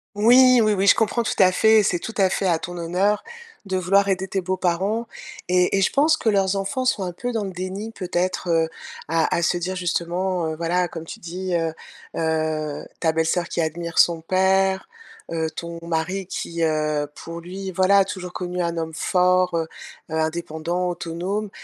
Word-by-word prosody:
Oui, 245 +4 +6
oui, 215 -1 +3
oui, 195 0 +1
je - - +8
comprends 230 +2 +1
tout - - -1
à 185 -2 +6
fait, 220 +3 +5
c'est 180 -3 +1
tout 225 - -7
à 190 -2 +4
fait 195 - -1
à 170 -3 +2
ton 175 +1 -6
honneur 180 +5 0 0.4
de 190 -1 -1
vouloir 195 +2 +3
aider 190 0 0
tes 190 0 -2
beaux-parents 185 +5 -1 0.4
et 180 +1 +3
et 195 - +2
je - - +2
pense 310 +3 +3
que 225 - 0
leurs 195 -1 +2
enfants 255 +7 -2
sont 250 - +1
un 180 - -4
peu 245 +8 -4
dans 225 -3 -2
le 195 - -4
déni 185 +4 -5
peut-être, 185 -2 -2
heu, 165 -1 +2 0.4
à 165 +1 +1
à 170 - 0
se 175 - +1
dire 180 +2 -3
justement, 180 0 -1
heu, 155 - -4
voilà 175 +2 0
comme 165 -1 -8
tu - - -9
dis, 180 +1 -4
heu 165 -1 0 0.4
heu, 155 -2 -1
ta 160 -2 +2
belle-sœur 165 +2 0
qui - - -3
admire 170 +1 -4
son 170 -2 +4
père, 190 +2 +2 0.4
heu, 160 -1 -1
ton 170 +1 -7
mari 170 +3 -2
qui, 170 -2 -4
heu, 155 -2 0
pour 165 0 -8
lui, 190 +3 -6
voilà, 190 +2 +4
a 195 - +4
toujours 180 -2 -6
connu 180 0 -3
un 170 0 -2
homme 160 -1 -3
fort, 180 +1 +2
heu 165 - +1 0.5
heu, - - -2
indépendant, 165 +2 -2
autonome. 175 +5 -3
180 Hz, 195 wpm, -23 LUFS, 165-195 Hz, 0.5 s, je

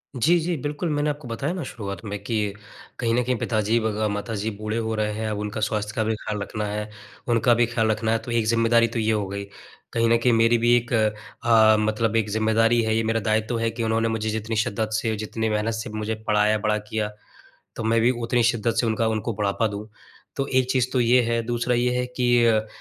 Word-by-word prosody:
जी, 165 +8 +3
जी 170 +1 -1
बिल्कुल 145 +4 -3
मैंने 145 +1 0
आपको 145 -2 -5
बताया 135 +8 -2
ना 180 -3 -4
शुरुआत 100 -4 -6
में 105 0 -4
कि 105 -4 -1 0.5
कहीं 115 -2 +1
न 125 - +2
कहीं 125 +1 0
पिताजी 110 +1 +1
ब 110 -1 -1
ग 110 0 +1
माताजी 105 +1 -3
बूढ़े 110 +1 -3
हो 110 -1 -2
रहे 105 -1 -1
हैं 110 +1 -3
अब 105 - -3
उनका 105 +1 -4
स्वास्थ्य 105 -1 -1
का 110 - +1
भी 110 0 0
ख़्याल 105 -1 -5
रखना 105 +1 -4
है। 105 +1 -4 0.4
उनका 120 0 +3
भी 120 0 +3
ख़्याल 115 -1 0
रखना 110 +1 -1
है 115 - +3
तो 120 - -5
एक 115 -2 +1
ज़िम्मेदारी 115 0 +3
तो 115 0 -4
ये 110 0 +1
हो 105 -2 0
गई। 100 +1 -5 0.5
कहीं 115 0 +2
न 115 - +5
कहीं 120 +1 +2
मेरी 115 +1 +4
भी 120 +1 +4
एक 120 +2 -1
अ, 110 0 +3
मतलब 110 +1 0
एक 110 -2 +1
ज़िम्मेदारी 110 +2 +2
है 110 0 +1
ये 115 - +1
मेरा 115 +1 0
दायित्व 110 +2 0
है 115 0 +1
कि 115 +1 -4
उन्होंने 115 0 +1
मुझे 110 -1 -2
जितनी 110 +1 -3
शिद्दत 110 0 -1
से 110 0 0
जितनी 110 +1 -3
मेहनत 105 +1 0
से 110 +2 -4
मुझे 110 +1 -3
पढ़ाया 105 0 +3
बड़ा 105 0 0
किया 105 0 -3 0.7
तो 115 - -4
मैं 115 +1 +2
भी 120 +2 +4
उतनी 120 +1 +1
शिद्दत 115 -1 +1
से 120 - 0
उनका 115 0 +1
उनको 110 +1 -2
बढ़ापा 100 +2 0
दूँ। 105 +1 -7 0.5
तो 135 - -1
एक 130 0 0
चीज़ 130 -2 +2
तो 130 - +2
ये 120 +1 +5
है, 115 0 0
दूसरा 120 +1 0
ये 120 +1 +2
है 125 - 0
कि 120 -1 +2
अ, 110 -1 +2
110 Hz, 235 wpm, -24 LUFS, 110-120 Hz, 0.7 s, न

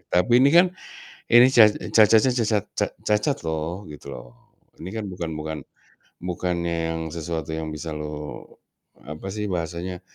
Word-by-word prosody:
Tapi 90 +7 +3
ini 135 - +6
kan, 175 +1 +6 0.6
ini 120 +2 +8
ca 110 -4 +8
cacatnya 110 +3 +4
cacat 110 -4 0
ca - - 0 0.2
cacat 105 +7 +1
loh, 80 +4 -3
gitu 75 - -12
loh. - - -12 0.5
Ini 85 - -6
kan 110 - -3
bukan 85 -2 -4
bukan 80 0 -5 0.7
bukannya 85 -1 -2
yang 80 0 -3
sesuatu 80 -1 -4
yang 80 0 -3
bisa 75 +1 -5
lo 75 -1 -7 0.5
apa 75 +8 -8
sih 105 -1 -3
bahasanya, 90 +1 -4
85 Hz, 150 wpm, -24 LUFS, 80-105 Hz, 0.7 s, ini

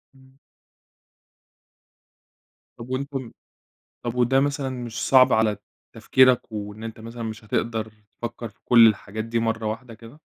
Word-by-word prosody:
إمم. 130 0 -22 2.4
طب 115 +1 -10
وأنتم 130 -1 -4 0.7
طب 120 0 -3
وده 125 +2 +3
مثلًا 140 -1 -1
مش 120 -3 -5
صعب 130 -1 +6
على 110 -1 +2 0.4
تفكيرك، 130 -3 +3
وإن 105 0 -6
أنت 115 0 -7
مثلًا 115 +1 -8
مش 110 0 -6
هتقدر 110 0 -2 0.3
تفكّر 120 -1 -5
في 100 - -28
كل 115 -2 +8
الحاجات 110 +1 -2
دي 115 0 -1
مرّة 115 0 -1
واحدة 115 +2 -5
كده؟ 115 +6 -14
115 Hz, 135 wpm, -24 LUFS, 110-130 Hz, 2.4 s, كل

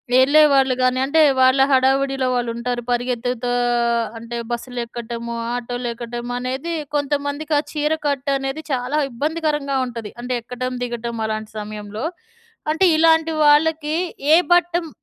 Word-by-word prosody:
వెళ్ళేవాళ్ళు 270 -1 +5
గానీ, 255 0 +2
అంటే, 315 +4 +3 0.2
వాళ్ళ 260 +1 +5
హడావుడిలో 270 0 +2
వాళ్ళుంటారు, 240 0 -2
పరిగెత్తుతా 245 0 -1 0.7
అంటే, 235 +1 -6
బస్సులెక్కటము, 235 -1 -5 0.2
ఆటోలెక్కటమనేదీ 245 +4 -4 0.2
కొంతమందికి 285 +2 -1
ఆ - - 0
చీర 300 +1 0
కట్టనేది 275 +1 -1
చాలా 260 +4 0
ఇబ్బందికరంగా 295 0 -1
ఉంటది, 230 -3 -7
అంటే, 250 +1 -3
ఎక్కటం, 255 +1 -4
దిగటం, 235 -1 -4
అలాంటి 215 0 -4
సమయంలో. 210 +2 -6 0.7
అంటే, 375 +5 +3
ఇలాంటి 320 0 +4
వాళ్ళకి 305 +1 +3 0.4
ఏ - - +9 0.2
బట్టమ్ 345 -1 +1
255 Hz, 110 wpm, -21 LUFS, 240-295 Hz, 0.7 s, ఏ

